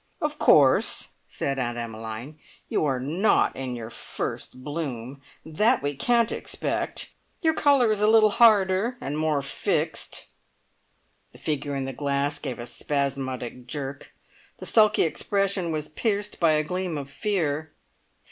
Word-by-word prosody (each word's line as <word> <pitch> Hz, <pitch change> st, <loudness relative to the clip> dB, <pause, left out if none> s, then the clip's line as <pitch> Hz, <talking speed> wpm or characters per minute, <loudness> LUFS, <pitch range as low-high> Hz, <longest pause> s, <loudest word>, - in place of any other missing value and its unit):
"Of 300 Hz, -3 st, -2 dB
course," 135 Hz, -3 st, +4 dB, 0.2 s
said 135 Hz, -1 st, -2 dB
Aunt 120 Hz, -1 st, -2 dB
Emmeline, 115 Hz, +5 st, -6 dB, 0.3 s
"you -, -, 0 dB
are 135 Hz, -3 st, 0 dB
not 165 Hz, +11 st, +2 dB
in 130 Hz, -2 st, -4 dB
your 115 Hz, -1 st, -7 dB
first 130 Hz, +2 st, -5 dB
bloom. 140 Hz, -4 st, -5 dB, 0.2 s
That 210 Hz, +11 st, +2 dB
we 145 Hz, 0 st, -1 dB
can't 235 Hz, -, +2 dB
expect. -, -, -3 dB, 0.3 s
Your 320 Hz, -1 st, +4 dB
colour 280 Hz, -7 st, +4 dB
is 210 Hz, -1 st, 0 dB
a 210 Hz, -, +4 dB
little 215 Hz, -1 st, +6 dB
harder 210 Hz, +1 st, +4 dB
and 140 Hz, -, -4 dB
more 155 Hz, -2 st, 0 dB
fixed" 140 Hz, -, -1 dB, 1.1 s
(the -, -, -14 dB
figure 145 Hz, -2 st, -2 dB
in 135 Hz, -1 st, -2 dB
the 135 Hz, -, -4 dB
glass 140 Hz, +2 st, -1 dB
gave 130 Hz, -4 st, -4 dB
a 120 Hz, -, -6 dB
spasmodic 130 Hz, -2 st, -3 dB
jerk. 140 Hz, 0 st, -5 dB, 0.5 s
The -, -, -8 dB
sulky 215 Hz, -2 st, +4 dB
expression 195 Hz, +1 st, 0 dB
was 155 Hz, -1 st, -3 dB
pierced 205 Hz, +3 st, -2 dB
by 165 Hz, -2 st, +4 dB
a 155 Hz, 0 st, +2 dB
gleam 180 Hz, 0 st, -2 dB
of 140 Hz, -2 st, -5 dB
fear. 155 Hz, -1 st, -1 dB
150 Hz, 145 wpm, -26 LUFS, 135-200 Hz, 1.1 s, little